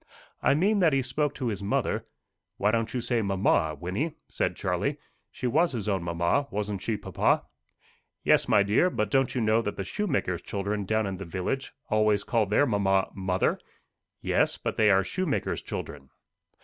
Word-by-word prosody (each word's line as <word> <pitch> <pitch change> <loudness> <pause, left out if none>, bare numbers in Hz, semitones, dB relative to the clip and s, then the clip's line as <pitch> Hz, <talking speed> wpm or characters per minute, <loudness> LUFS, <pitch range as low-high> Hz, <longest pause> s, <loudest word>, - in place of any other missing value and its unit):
"I - - +4
mean 200 +7 +2
that 165 -5 +4
he 135 -1 +2
spoke 145 +4 -1
to 125 -3 -2
his 100 -3 -4
mother 100 +1 -1 0.2
" - - -57
"Why 105 +1 +2
don't 115 0 0
you 125 - -2
say 120 -1 0
mamma, 95 -6 +1
Wynnie?" 130 - -2
said - - -1
Charlie. - - -1 0.3
"She - - -7
was 155 +6 +2
his 110 -4 -3
own 95 -3 +1
mamma, 85 +11 0
wasn't 105 -1 -3
she, 110 -1 -1
papa?" 100 - +1 0.8
"Yes, - - +4
my 105 -2 +5
dear; 105 - +3
but 105 - -2
don't 135 -1 +2
you 125 - +1
know 110 +1 +3
that 105 -2 -4
the 95 - -2
shoemaker's 115 - -1
children 100 +1 -3
down 110 +2 +1
in 95 -1 -3
the - - -6
village 95 +10 -3 0.2
always 105 -1 +3
call 115 -2 +1
their 105 +8 +3
mamma 95 -4 +1
mother?" 95 -2 0 0.6
"Yes; - - +1
but - - -3
they 110 -1 +4
are 95 -1 +5
shoemaker's 150 - -2
children." 70 -2 -7
105 Hz, 185 wpm, -27 LUFS, 95-130 Hz, 0.8 s, my